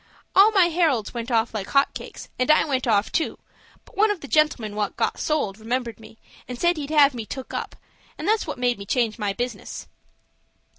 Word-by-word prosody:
All 395 Hz, +3 st, +8 dB
my 380 Hz, -5 st, +4 dB
Heralds 315 Hz, -, +1 dB
went 235 Hz, 0 st, -5 dB
off 230 Hz, -1 st, +1 dB
like 200 Hz, -3 st, -4 dB
hot 275 Hz, 0 st, +2 dB
cakes, -, -, -9 dB
and 255 Hz, -, 0 dB
I 305 Hz, -, +5 dB
went 260 Hz, -4 st, -1 dB
off, 210 Hz, -2 st, +2 dB
too, 325 Hz, -, -1 dB, 0.5 s
but -, -, -20 dB
one 430 Hz, +2 st, +4 dB
of 410 Hz, -4 st, -2 dB
the 285 Hz, -, -8 dB
gentlemen 275 Hz, -9 st, +1 dB
what 210 Hz, -1 st, -2 dB
got -, -, -1 dB
sold 225 Hz, -10 st, -1 dB
remembered 235 Hz, +1 st, -3 dB
me, 220 Hz, 0 st, -15 dB, 0.3 s
and 250 Hz, -1 st, -7 dB
said 345 Hz, -1 st, +2 dB
he'd 290 Hz, -1 st, -5 dB
have 295 Hz, -3 st, +5 dB
me 235 Hz, -2 st, -5 dB
took 260 Hz, +4 st, -8 dB
up, -, -, -4 dB, 0.4 s
and 315 Hz, -, -5 dB
that's 435 Hz, -3 st, +1 dB
what 300 Hz, -, -4 dB
made 245 Hz, -2 st, 0 dB
me 200 Hz, -, -7 dB
change 235 Hz, 0 st, 0 dB
my 205 Hz, -2 st, 0 dB
business." 245 Hz, +5 st, -5 dB
255 Hz, 210 wpm, -24 LUFS, 225-305 Hz, 0.5 s, All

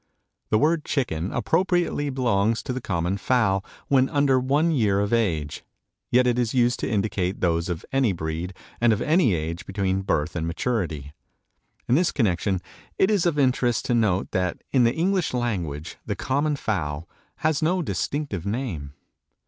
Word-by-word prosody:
The 110 Hz, -, +3 dB
word 155 Hz, +5 st, +2 dB
chicken 95 Hz, -, -1 dB
appropriately 165 Hz, -, +1 dB
belongs 115 Hz, -4 st, +1 dB
to 125 Hz, -, -3 dB
the 130 Hz, -, -4 dB
common 90 Hz, -2 st, -1 dB
fowl 100 Hz, -4 st, +1 dB, 0.2 s
when 135 Hz, -1 st, +3 dB
under 140 Hz, -2 st, +3 dB
one 145 Hz, +6 st, +2 dB
year 105 Hz, -9 st, +2 dB
of 100 Hz, +2 st, 0 dB
age, 80 Hz, -10 st, 0 dB, 0.5 s
yet 125 Hz, +1 st, +4 dB
it 125 Hz, 0 st, +2 dB
is 120 Hz, 0 st, 0 dB
used 120 Hz, 0 st, +3 dB
to -, -, -2 dB
indicate 100 Hz, -3 st, -1 dB
those 85 Hz, -1 st, 0 dB
of 85 Hz, -2 st, -4 dB
any 135 Hz, -5 st, +2 dB
breed 85 Hz, +1 st, -4 dB, 0.3 s
and 120 Hz, -1 st, +5 dB
of 105 Hz, -, -2 dB
any 155 Hz, -, +3 dB
age 80 Hz, +2 st, -4 dB
between 95 Hz, -1 st, -1 dB
birth 75 Hz, -6 st, -1 dB
and 80 Hz, -1 st, -2 dB
maturity. 85 Hz, -, -2 dB, 0.7 s
In -, -, +2 dB
this 170 Hz, +6 st, +3 dB
connection 95 Hz, -, 0 dB, 0.4 s
it 190 Hz, -, +3 dB
is 195 Hz, -4 st, +2 dB
of 160 Hz, -3 st, 0 dB
interest 125 Hz, -3 st, +2 dB
to -, -, +1 dB
note 105 Hz, -5 st, +1 dB
that 90 Hz, -2 st, -1 dB
in 130 Hz, -3 st, +4 dB
the 115 Hz, -, +2 dB
English 180 Hz, -3 st, 0 dB
language 85 Hz, -11 st, -3 dB
the -, -, -3 dB
common 145 Hz, +3 st, 0 dB
fowl 85 Hz, -, -3 dB, 0.3 s
has 155 Hz, -2 st, 0 dB
no 175 Hz, +3 st, +1 dB
distinctive 105 Hz, -, -2 dB
name. 100 Hz, -, -4 dB
115 Hz, 165 wpm, -24 LUFS, 90-135 Hz, 0.7 s, and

